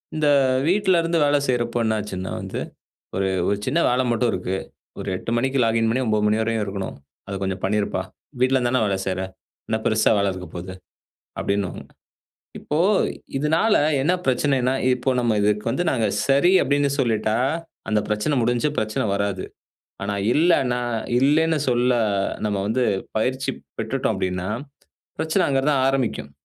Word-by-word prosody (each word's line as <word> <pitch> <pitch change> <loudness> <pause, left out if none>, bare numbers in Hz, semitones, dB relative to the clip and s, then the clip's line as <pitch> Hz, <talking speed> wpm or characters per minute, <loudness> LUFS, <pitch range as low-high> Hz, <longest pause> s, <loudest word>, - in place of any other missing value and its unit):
இந்த 155 -1 +1 0.4
வீட்ல 190 -1 +3
இருந்து 165 0 0
வேலை 145 0 +3
செய்றப்போ 120 -2 0
என்ன 110 -1 +1
ஆச்சுன்னா 95 -3 -5
வந்து, - - -5 0.6
"ஒரு, 95 0 0 0.2
ஒரு 100 - +2
சின்ன 165 - +1
வேலை 125 +1 +2
மட்டும் 120 +1 +2
இருக்கு. 90 +1 -2 0.4
ஒரு - - -5
8:00 105 - -6
மணிக்கு 135 +3 0
லாகின் 115 0 +2
பண்ணி 130 +3 0
9:00 105 -1 +1
மணி 105 +1 +3
வரையும் 110 -1 0
இருக்கணும். 95 -1 -5 0.3
அத 100 - -5
கொஞ்சம் 95 -1 -2
பண்ணிருப்பா! 105 +1 0 0.4
வீட்ல 130 +1 +3
இருந்து 125 -1 +1
தானே 130 -2 +2
வேலை 100 -1 0
செய்ற. 95 -1 -1 0.5
என்ன 110 - 0
பெருசா 110 0 +3
வேலை 100 - +2
இருக்கப் 90 -3 -9
போகுது", 90 +1 -6 0.7
அப்படின்னுவாங்க. 100 -2 -2 0.8
இப்போ 150 - -3 0.6
இதனால 160 +10 +2 0.3
என்ன 165 +7 +2
பிரச்சனைனா, 130 -1 +2 0.2
இப்போ 125 +1 -1
நம்ம 120 -3 +1
இதுக்கு 105 0 +1
வந்து 155 +8 0
நாங்க 115 -4 +1 0.2
சரி 140 +6 +4
அப்படின்னு 140 +1 +2
சொல்லிட்டா, 110 -4 +1 0.5
அந்த 105 0 +2
பிரச்சனை 105 +8 0
முடிஞ்சு. 120 +5 +1
பிரச்சனை 110 0 -1
வராது. 100 -2 -2 0.6
ஆனா, 100 +1 -2 0.2
இல்லனா, 135 -6 +3 0.4
இல்லன்னு 155 +4 +3
சொல்ல 125 +1 +2 0.5
நம்ம 105 -1 0
வந்து 115 +5 0 0.3
பயிற்சி 130 +4 0 0.3
பெற்றுட்டோம் - - -1
அப்படின்னா, 90 0 -2 0.7
பிரச்சனை 160 +4 +1
அங்க 135 -1 +2
தான் 135 -3 +2
ஆரம்பிக்கும். 120 - -1
120 Hz, 150 wpm, -23 LUFS, 105-135 Hz, 0.8 s, சரி